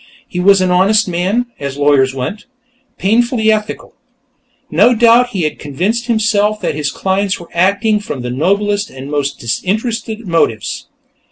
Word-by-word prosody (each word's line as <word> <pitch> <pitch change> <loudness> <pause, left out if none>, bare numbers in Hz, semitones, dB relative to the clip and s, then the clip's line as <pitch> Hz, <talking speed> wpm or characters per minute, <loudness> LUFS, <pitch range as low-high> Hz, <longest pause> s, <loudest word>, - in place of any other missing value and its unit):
He 180 - -5
was 195 +1 +4
an 185 -1 +1
honest 200 +4 +3
man, 185 +7 0
as 140 0 -5
lawyers 145 -2 +3
went; 135 - -5 0.5
painfully 225 +2 +2
ethical. 215 0 -3 0.8
No 245 - +4
doubt 235 +2 +5
he 190 -7 -3
had 155 - -2
convinced 195 - -2
himself 215 -2 +1
that - - -1
his 150 -1 -2
clients 190 +5 -1
were 170 - -13
acting 200 +5 +2
from 145 -11 -6
the 125 - -4
noblest 200 +9 0
and 135 +2 -9
most 145 -1 -2
disinterested 220 - -3
motives. 140 - -1
195 Hz, 150 wpm, -15 LUFS, 150-220 Hz, 0.8 s, doubt